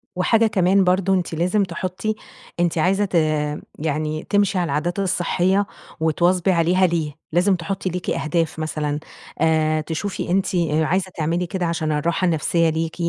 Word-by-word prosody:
وحاجة 220 +5 +3
كمان 195 -1 +3
برضو، 185 +1 +2
أنتِ 180 -3 -1
لازم 180 +5 +1
تحطي 185 +4 -3 0.4
أنتِ 175 -1 +1
عايزة 195 +5 +2
ت 190 - -5 0.6
يعني 155 0 -2
تمشي 205 -1 +2
على 180 - +1
العادات 170 +5 -1
الصحية، 185 +1 +1 0.3
وتواظبي 175 +3 +2
عليها 180 +2 +3
ليه؟ 160 -3 -1 0.2
لازم 180 +4 +3
تحطي 190 +2 -3
ليكِ 180 0 -4
أهداف 160 0 -1
مثلًا، 150 -2 -2 0.4
آآ 155 -1 +2
تشوفي 170 +6 -4
أنتِ 190 0 +1
آآ 160 -2 +1
عايزة 185 +2 0
تعملي 165 +3 0
كده 180 0 -3
عشان 160 -2 -1
الراحة 165 +5 0
النفسية 165 0 +2
ليكِ، 160 0 -2
175 Hz, 150 wpm, -21 LUFS, 160-185 Hz, 0.6 s, وحاجة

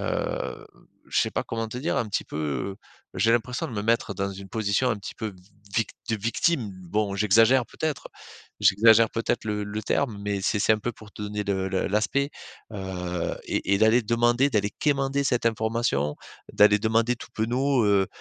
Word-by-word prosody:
heu - - -3 0.4
je - - +2
sais - - 0
pas - - -1
comment 115 0 -3
te 115 - -7
dire 155 - -1
un 115 - 0
petit 100 - -1
peu 75 +5 -3 0.4
j'ai 115 +5 +3
l'impression 120 +2 0
de - - -8
me 105 -2 -3
mettre 115 -2 +1
dans 100 +1 -2
une 95 0 -9
position 110 +4 0
un 110 - 0
petit 105 +4 -8
peu 110 - -4
v - - -9 0.4
vict 110 -3 +1 0.2
de 110 - +1
victime. 115 - 0
Bon, 105 +2 -1
j'exagère 115 +5 +4
peut-être 155 -3 -3 0.5
j'exagère 110 +2 +6
peut-être 115 - -1
le 105 -1 -2
le 105 +1 -5
terme, 115 -1 -1
mais 100 -1 -2
c'est 105 - 0
c'est 105 - +4
un 110 - +1
peu 120 +3 -3
pour 110 -1 -15
te - - -12
donner 105 0 -3
le 95 -1 -1
le 95 0 -1
l'aspect, 115 +8 +1 0.4
heu, 90 -3 -3
et 100 - 0
et - - +2
d'aller 110 +3 +5
demander, 120 +4 +2
d'aller 105 -4 +1
quémander 140 -1 +1
cette 125 -3 +1
information. 110 - 0 0.4
D'aller 105 0 +6
demander 115 +3 +1
tout - - -11
penaud, 125 +2 +1
heu, 100 -2 +3
110 Hz, 190 wpm, -26 LUFS, 100-120 Hz, 0.5 s, j'exagère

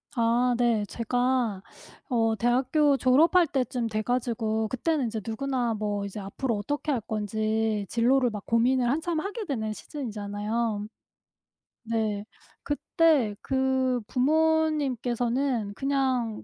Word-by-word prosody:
아 240 +1 +2
네. 235 -3 +2
제가 245 -2 0 0.5
어 225 -3 +2
대학교 265 +5 +2
졸업할 325 +8 +4
때쯤 250 -4 -1
돼 215 -1 -2
가지고 225 -2 -1
그때는 275 +4 0
인제 220 -1 -3
누구나 245 +1 -1
뭐 205 -1 -2
이제 200 +1 -6
앞으로 215 +4 -3
어떻게 290 +8 -2
할 260 - +1
건지 215 0 -1
진로를 245 +4 +2
막 210 -3 -7
고민을 240 +2 +2
한참 320 +4 0
하게 415 +4 -5
되는 220 - -2
시즌이잖아요. 215 -3 -3 1.0
네. 220 -3 -1 0.4
그때 290 -6 +2
그 260 -1 +1
부모님께서는 265 -5 +1
그냥 260 -5 -1
240 Hz, 250 characters per minute, -27 LUFS, 220-270 Hz, 1.0 s, 졸업할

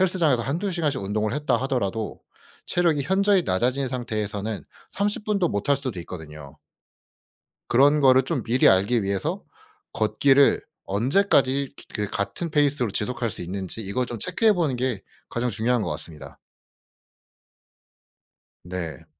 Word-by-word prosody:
헬스장에서 170 -9 +2
1-2 165 - -2
시간씩 155 - -1
운동을 105 +2 -1
했다 150 +2 +1
하더라도 115 -5 -2 0.5
체력이 165 -5 +1
현저히 195 +4 +3
낮아진 125 - 0
상태에서는 110 -4 -3 0.3
30 205 +1 -1
분도 200 -5 +1
못 100 -2 -3
할 140 - +4
수도 130 -8 -5
있거든요. 75 -5 -10 1.1
그런 140 +5 +5
거를 130 -2 +6
좀 130 -1 -2
미리 120 +3 +3
알기 100 +4 +3
위해서 100 0 -2 0.5
걷기를 135 +6 +3 0.2
언제까지 135 - +2
기 - - -13
그 105 -2 -1
같은 160 - -3
페이스로 145 -6 +2
지속할 120 +3 -1
수 - - -5
있는지 95 +3 -5
이걸 110 +5 -2
좀 120 -2 -6
체크해 215 - +3
보는 160 -8 0
게 120 -5 -1 0.3
가장 120 +1 -1
중요한 115 +2 0
것 90 - -2
같습니다. 75 -2 -6 2.3
네. 90 -3 -6
125 Hz, 295 characters per minute, -24 LUFS, 100-145 Hz, 2.3 s, 거를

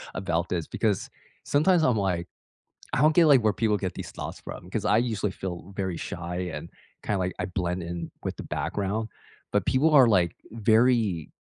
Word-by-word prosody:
about 85 -2 -1
this 85 -3 -1
because, 105 -5 -1 0.3
sometimes, 160 +4 +3
I'm 125 -6 +3
like 90 -4 -1 0.7
I - - +2
don't 155 +1 +5
get, 175 - +7
like, 140 -4 +6
where 110 -1 +3
people 110 -2 +1
get 95 -2 -3
these - - -7
thoughts - - -6
from, - - -9
'cause - - -2
I 105 - +4
usually 110 -4 0
feel 90 0 -6
very 95 -3 -2
shy 85 +1 -5 0.2
and, 85 - -6 0.3
kinda, 105 - 0
like 90 -1 -1
I - - 0
blend 90 -1 -2
in 85 -1 -5
with - - -3
the - - -6
background, 95 +8 -2 0.5
but 105 -2 +2
people 140 +5 +3
are, 135 -4 +8
like, 90 -6 +3 0.2
very, 110 - +2
100 Hz, 190 wpm, -26 LUFS, 90-115 Hz, 0.7 s, are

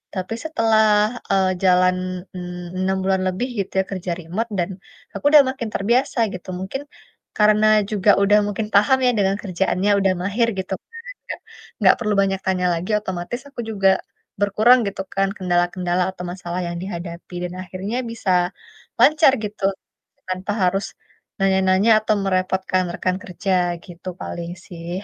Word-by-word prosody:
Tapi 185 +3 -3
setelah, 225 -8 +3 0.5
eee, 190 -1 +3
jalan 185 0 +4 0.4
en 180 - -5 0.4
enam 190 +1 0
bulan 190 0 +1
lebih 185 +7 -1
gitu 195 - -3
ya, - - +3
kerja 185 -2 -3
remote 185 +8 -3
dan 175 +1 0 0.5
aku - - -7
udah 300 -1 +9
makin 255 -4 -4
terbiasa, 240 +7 +1 0.2
gitu. 185 0 -8
Mungkin 190 +9 -4 0.6
karena 215 0 +4 0.3
juga 205 -1 +1
udah 205 +1 +5
mungkin 210 +1 -3
paham 210 +6 +5
ya 250 - +5
dengan 195 0 +2
kerjaannya, 190 +1 0
udah 195 -1 +2
mahir, 215 +5 +1
gitu 190 0 -4
kan, - - -66 0.3
nggak - - -6 0.4
nggak - - +6
perlu 215 -3 0
banyak 195 -1 0
tanya 185 -1 0
lagi, 170 +3 -4
otomatis 190 +4 -5
aku 280 - -13
juga 195 -3 +3 0.5
berkurang, 215 +5 +5
gitu 195 -1 -4
kan, 195 0 +2
kendala-kendala 175 0 0
atau 185 - -9
masalah 180 -1 -5
yang 170 0 -4
dihadapi. 175 -2 -7
Dan 180 0 -4
akhirnya 190 +5 -5
bisa 225 -5 -2 0.7
lancar 305 -2 +6
gitu, 210 -1 -6 0.7
tanpa 185 +2 -3
harus 195 +2 +1 0.5
nanya-nanya 190 +2 +3
atau 215 0 +1
merepotkan 185 0 0
rekan 185 +1 -1
kerja, 190 +1 -3 0.3
gitu 175 0 -12
paling 170 0 -5
sih. 170 -1 -9
190 Hz, 150 wpm, -21 LUFS, 185-210 Hz, 0.7 s, udah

